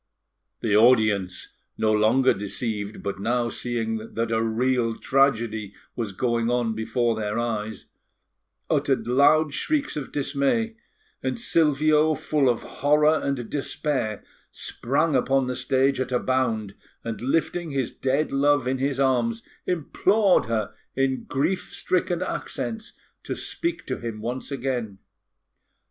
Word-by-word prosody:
The 105 -3 +1
audience, 110 -5 +3 0.2
no 110 - +2
longer 110 +5 +4
deceived, 105 +1 -4
but 100 -1 -3
now 120 +3 0
seeing 115 -2 -3
that 115 0 -1
a 115 0 +2
real 115 +1 +1
tragedy 115 -7 +1 0.2
was 115 -4 -3
going 115 +3 0
on 120 -2 +1
before 115 +1 0
their 105 -1 -2
eyes, 110 -2 -3 0.8
uttered - - +1
loud 145 +4 +4
shrieks 300 - -1
of 150 -2 -5
dismay; 145 +11 0 0.5
and - - -2
Silvio, 155 - +3
full 145 -1 +1
of 120 - 0
horror 150 +2 +3
and 135 -4 -2
despair, 135 -6 -2 0.3
sprang 145 +4 -1
upon 135 +1 +2
the 125 0 -3
stage 130 +2 +1
at 130 -1 -2
a 125 - +3
bound, 115 -6 0 0.3
and, 115 -1 -5
lifting 165 +5 0
his 135 -4 -1
dead 135 +3 0
love 145 -1 +3
in 130 +1 -1
his 135 0 -1
arms, 120 -4 +1 0.2
implored 185 +4 +2
her 110 -2 -1 0.2
in 135 -1 0
grief 180 +8 -1
stricken 180 -1 0
accents 225 +4 -4 0.3
to - - -4
speak 340 0 -3
to 130 - -3
him 115 -2 -5
once 120 +4 -4
again. 125 -6 -3
130 Hz, 130 wpm, -25 LUFS, 115-145 Hz, 0.8 s, longer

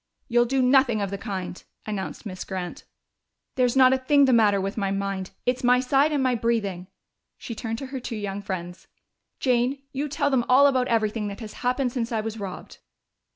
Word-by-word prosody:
"You'll 240 -1 +3
do 265 +2 +1
nothing 250 -3 +4
of 200 -2 -2
the 200 - -3
kind!" 185 -4 -5 0.2
announced 205 +1 -5
Miss 185 -3 -6
Grant. 185 -2 -6 0.7
"There's 250 -1 +1
not 260 -1 +6
a 265 - +1
thing 280 +2 +4
the 260 - +3
matter 210 -4 +4
with 195 +1 -3
my 200 -3 -1
mind 195 -1 -3 0.2
it's 250 +1 0
my 250 0 +5
side 270 +4 +2
and 285 -3 +1
my 255 -1 +2
breathing." 210 -6 -1 0.5
She 235 - -7
turned 225 0 -4
to 270 - -6
her 265 - -2
two 240 -1 -5
young 205 -1 -4
friends. 180 -3 -6 0.5
"Jane, 255 +2 +1
you 285 +2 -2
tell 285 0 0
them 255 -3 +2
all 265 +3 +7
about 260 -3 +3
everything 215 -1 0
that 200 -1 -6
has 215 -2 -7
happened 250 0 0
since 235 -2 -3
I 225 - 0
was 220 0 -5
robbed." 195 -3 -8
230 Hz, 200 wpm, -25 LUFS, 200-255 Hz, 0.7 s, all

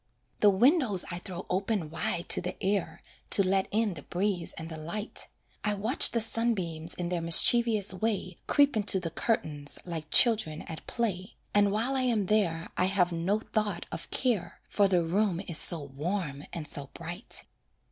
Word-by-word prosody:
The 210 - +5
windows 235 - +3
I 175 - -4
throw 180 0 -8
open 190 -3 -2
wide 170 +1 -2
to - - +2
the 180 +1 -5
air 190 -4 -2 0.3
To 200 - +5
let 190 0 +1
in 215 -1 0
the 150 - -9
breeze 180 +1 -2
and 160 - -7
the 165 - -7
light; 170 +8 -4 0.4
I 210 0 0
watch 220 +7 +3
the 235 - -1
sunbeams 190 -8 +1
in 175 -1 -4
their 175 -1 -2
mischievous 210 +5 +6
way 195 -2 -3
Creep 285 -2 +3
into 205 -3 +3
the 170 -2 -5
curtains, 150 -9 -2
like 160 -3 -6
children 215 -10 +3
at 160 - -10
play, 200 -5 -3 0.2
And 205 -1 +3
while 230 +6 -1
I 265 - +1
am 235 -6 0
there 180 -5 0
I 180 - +1
have 185 -2 +1
no 180 +6 -1
thought 210 -6 -3
of - - -7
care, 200 -10 -2
For 200 -1 +2
the 180 -3 +1
room 185 +1 0
is 170 - +3
so 165 -4 +3
warm 145 +1 -4
and 160 -3 -6
so 140 -1 0
bright. 175 +6 -2
190 Hz, 175 wpm, -28 LUFS, 170-215 Hz, 0.4 s, mischievous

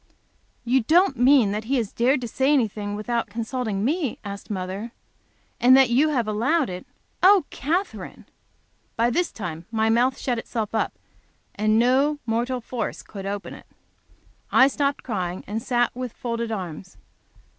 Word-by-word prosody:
"You 255 +2 +3
don't 330 - +3
mean 250 -3 +5
that 210 +1 -3
he 270 +4 0
has 225 -4 -2
dared 255 +3 +2
to 240 - -4
say 265 +5 +1
anything 210 -6 0
without 230 +3 -2
consulting 225 -2 -3
me?" 300 -2 -1
asked 200 -1 -8
mother. 195 +4 -4 0.7
"And 255 +2 +7
you 270 +3 +4
have 245 -7 0
allowed 245 - +1
it! 180 0 -8 0.3
Oh, 385 -3 +6
Katherine!" 350 +7 -3 0.7
This 240 +10 +1
time 170 -5 -6
my 220 -1 +1
mouth 250 +3 +2
shut 245 -3 -2
itself 225 -2 -4
up, 220 - 0 0.6
and 215 +1 +2
no 265 +5 +3
mortal 240 +2 -1
force 230 -1 -4
could 195 -2 -8
open 200 0 -5
it. - - -13 0.8
I 260 - +7
stopped 280 0 -1
crying, 185 -6 -3
and 215 +3 -4
sat 240 0 0
with 250 -2 -5
folded 235 -1 -3
arms. 185 -3 -6
235 Hz, 150 wpm, -24 LUFS, 210-265 Hz, 0.8 s, And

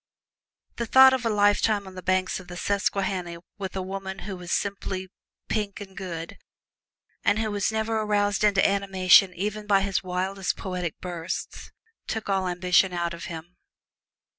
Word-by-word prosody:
The 235 - -2
thought 265 +2 +8
of 250 -3 0
a - - +1
lifetime 205 0 +2
on 190 - -10
the 185 - -8
banks 185 +1 0
of 185 - -13
the 175 - -8
Susquehanna 190 -3 -1 0.2
with 190 -2 -5
a 190 - -2
woman 190 0 -5
who 200 -2 -5
was 175 -1 -8
simply 195 -2 -2 0.4
pink 210 -2 -2
and 195 -2 -10
good, 170 -4 -6 0.8
and 205 - +3
who 220 -1 -1
was 205 +1 0
never 220 0 -1
roused 205 -1 +1
into 200 -2 +4
animation 195 -1 +5
even 210 +3 -3
by 200 -2 +4
his 195 -1 0
wildest 185 +1 -2
poetic 180 -3 -4
bursts, 175 -1 -5 0.4
took 220 -2 -4
all 190 -1 +1
ambition 180 +1 +2
out 170 -1 -1
of 170 - -7
him. 170 +1 -8
195 Hz, 165 wpm, -26 LUFS, 180-205 Hz, 0.8 s, thought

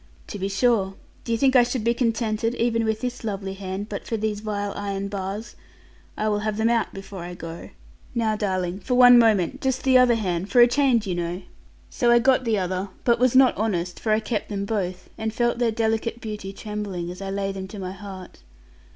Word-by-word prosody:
'To 205 - -7
be 195 - -1
sure. 195 -2 +1 0.3
Do 235 - -5
you 230 - +2
think 265 +2 +3
I 250 - +8
should 240 -1 -1
be 235 +1 +2
contented, 230 -1 0
even 230 -1 +1
with 220 0 -1
this 250 -1 -4
lovely 195 -3 -3
hand, 195 +1 -5
but 205 -2 -5
for 225 - -1
these 215 -1 -2
vile 205 -1 -3
iron 200 -1 -3
bars. 200 +3 -5 0.6
I 215 - 0
will 210 -1 +1
have 210 0 -2
them 220 +1 +2
out 230 -2 +1
before 195 0 -9
I 175 +1 -7
go. 165 -1 -8 0.5
Now, 225 -2 +1
darling, 185 -3 -2
for 250 +5 -1
one 245 -1 +8
moment 225 +2 +2
just 265 -1 -1
the 260 -1 +5
other 250 -2 +5
hand, 185 -3 -2
for 250 - +3
a 240 - +10
change, 245 -3 +2
you 190 - -2
know.' 175 +1 -3 0.5
So 240 -3 +1
I 240 - +7
got 255 +1 +3
the 225 -2 +1
other, 185 +1 -2
but 235 -1 +3
was 255 0 +3
not 260 -1 +6
honest; 180 -5 -2
for 220 - -1
I 215 - +4
kept 220 -1 -3
them 200 -1 -3
both, 185 -4 -3
and 220 0 -2
felt 240 +1 0
their 240 -2 +2
delicate 225 +1 -1
beauty 210 -4 -6
trembling, 195 -4 -5
as 180 - -10
I 195 - -4
laid 195 0 -2
them 190 0 -5
to 210 - -10
my 185 -2 -5
heart. 190 -2 -10
215 Hz, 220 wpm, -24 LUFS, 195-235 Hz, 0.6 s, a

